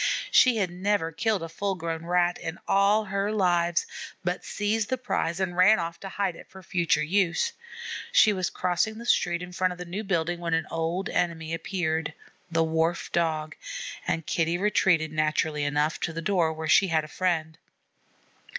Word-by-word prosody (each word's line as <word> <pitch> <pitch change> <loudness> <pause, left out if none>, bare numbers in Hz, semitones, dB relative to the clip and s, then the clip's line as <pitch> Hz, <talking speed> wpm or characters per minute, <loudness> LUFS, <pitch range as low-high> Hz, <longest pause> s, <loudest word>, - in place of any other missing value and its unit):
She 250 -3 +6
had 190 -4 0
never 185 -2 0
killed 210 +2 0
a - - -4
full 195 +4 -2
grown 165 -1 -4
Rat 175 0 +2
in 165 +1 -5
all 200 +2 +3
her 200 +1 -1
lives, 175 -4 +2 0.4
but 180 0 -2
seized 210 +1 -1
the 260 - 0
prize 175 -8 -2
and 185 -2 -1
ran 195 +5 +6
off 170 -1 -4
to 195 - -7
hide 195 -3 -1
it - - -13
for 190 0 -13
future 170 -4 +1
use. 190 - +1 0.6
She 215 - +6
was 185 -2 -1
crossing 185 +5 -1
the 235 - -8
street 175 -6 +1
in 180 - -8
front 180 0 0
of - - -13
the 180 - -6
new 185 +5 -4
building 175 -3 -1
when 170 -1 0
an 165 -1 0
old 165 +3 -1
enemy 165 -2 -1
appeared, 160 -3 -2 0.3
the 165 -1 +2
Wharf 160 +1 0
Dog, 160 -2 -1 0.5
and 165 -1 -1
Kitty 165 +1 0
retreated, 180 -5 +2
naturally 155 -1 0
enough, 150 +2 0
to 165 - -2
the 165 - -4
door 175 -3 +2
where 160 0 -5
she 195 +5 +5
had 160 -3 +1
a - - -8
friend. 160 -1 -1
175 Hz, 185 wpm, -27 LUFS, 160-195 Hz, 0.6 s, She